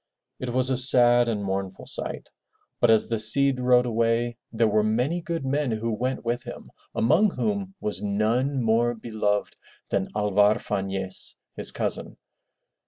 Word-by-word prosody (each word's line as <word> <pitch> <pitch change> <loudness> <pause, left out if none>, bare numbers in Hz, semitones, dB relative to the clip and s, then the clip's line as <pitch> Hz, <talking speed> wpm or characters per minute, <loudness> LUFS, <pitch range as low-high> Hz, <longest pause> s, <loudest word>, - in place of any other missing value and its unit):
It 130 - -4
was 130 +2 0
a 130 - +1
sad 120 -2 +4
and 105 -3 -2
mournful 95 -1 -4
sight. - - -5 0.5
But 120 - +3
as 110 -1 +5
the 115 -1 -1
Cid 135 +4 +5
rode 125 0 +3
away 115 0 0 0.2
there 115 0 +2
were 105 0 +2
many 125 +11 0
good 165 -4 -4
men 140 +1 0
who 115 +1 -2
went 125 +3 -3
with 120 +1 -1
him, - - -10 0.2
among 160 - +3
whom 200 -1 -3
was 105 -7 -2
none 115 +6 0
more 115 +2 +2
beloved 110 -2 -2 0.4
than 95 -1 0
Alvar 105 0 +3
Fanez, 95 -2 -2 0.2
his - - -1
cousin. - - -4
115 Hz, 155 wpm, -25 LUFS, 105-130 Hz, 0.5 s, as